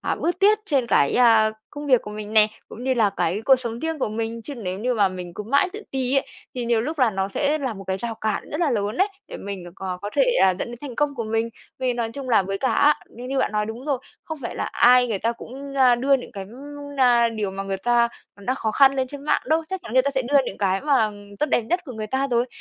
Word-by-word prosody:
à, - - -1
bước 350 +2 -2
tiết 420 +2 +5
trên 275 - +1
cái, 140 - +3
a, 225 -3 +5 0.2
công 290 0 -7
việc 255 -4 +4
của 210 - -8
mình 210 0 -7
nè, 215 -1 +6 0.2
cũng 245 - -9
như 260 -1 +2
là 215 -4 +3
cái 190 +6 0
cuộc 270 - +7
sống 235 -2 -5
riêng 320 -1 -2
của 255 - 0
mình. 225 +1 -4
Chứ 285 - -7
nếu 190 -6 -4
như 245 +3 0
mà 200 -3 +3
mình 180 -2 -7
cứ - - -5
mãi 280 - +2
tự 425 +1 -7
ti 260 -1 0
ấy 275 - +1 0.3
thì 250 -2 -3
nhiều 235 -1 +2
lúc 300 +6 -4
là 250 -4 +4
nó 195 -1 -2
sẽ 290 +9 0
là 260 -6 -3
một 195 0 -9
cái 190 0 -1
rào 230 +3 -4
cản 215 -2 -3
rất 300 - -3
là 315 -5 +2
lớn 210 -1 -1
đấy, 385 +3 +3 0.2
để - - -7
mình 195 -2 -6
cò 185 -2 -4
có 205 - -4
thể, - - +5 0.2
ờ, 190 - +6
dẫn - - -3
đến 240 - -7
thành 275 -5 -7
công 295 -1 +1
của 230 -4 -3
mình. 225 +1 0 0.3
Vì 255 -1 0
nói 235 -2 -2
chung 275 -1 -7
là 225 -5 +4
với 195 +1 -3
cả 260 - +1
á 295 +1 +5 0.2
như 245 +2 -10
như 270 0 -1
bạn - - +1
nói 210 0 0
đúng 230 +4 -7
rồi, 275 -4 0 0.3
không 315 -1 -6
phải 235 - -4
là - - -1
ai 250 +1 +5
người 205 -4 -1
ta 230 +3 0
cũng, 275 +4 -9
a, 255 -2 +6
đưa 275 +3 +3
những 250 -1 -9
cái, 195 -2 -6
ưm, 285 +3 -9
na, 240 -3 +5
điều 215 -3 -3
mà 195 +1 -5
người 195 0 -3
ta 235 +3 +2 0.3
đã 205 +6 -2
khó 225 -5 -2
khăn 275 +2 +5
lên 260 -1 0
trên 285 +2 -9
mạng - - +1
đâu. 320 +1 +2
Chắc 380 -1 -4
chắn 230 - -9
người 260 +1 +5
ta 280 - 0
sẽ 265 - +1
đưa 280 +4 +3
những - - -6
cái 195 -1 +1
mà 265 -8 +2 0.3
tốt 300 - +1
đẹp - - +3
nhất 350 +11 0
của 260 - -8
người 215 -2 -5
ta 265 +5 0
rồi. 240 -1 +1
240 Hz, 290 wpm, -23 LUFS, 215-275 Hz, 0.3 s, cuộc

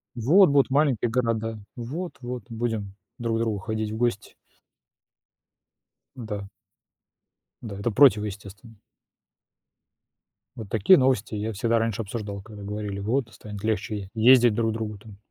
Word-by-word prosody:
Вот 150 - +5
будут 140 -1 +3
маленькие 130 -5 +2
города, 115 -2 -1 0.2
вот-вот 125 - -6
будем 110 -4 -3 0.2
друг 115 -1 -1
к - - -1
другу 110 -3 -1
ходить 110 +1 -3
в 110 - -4
гости. 115 -4 -1 1.8
М-да. 105 -5 -6 1.2
Да, 100 -4 -7
это 115 +4 -1
противоестественно. 105 -3 +2 1.8
Вот 110 -4 -8
такие 110 - +5
новости 130 - +1
я 105 +2 -2
всегда 115 +3 +1
раньше 115 -1 -1
обсуждал, 100 -1 -5
когда 105 0 -11
говорили, 105 -1 -4
вот 120 +5 0
станет 105 -2 -9
легче 105 -2 -2
ездить 120 +1 +6
друг 115 0 +1
другу 110 -1 -4
там. 100 -1 -14
110 Hz, 125 wpm, -25 LUFS, 105-120 Hz, 1.8 s, ездить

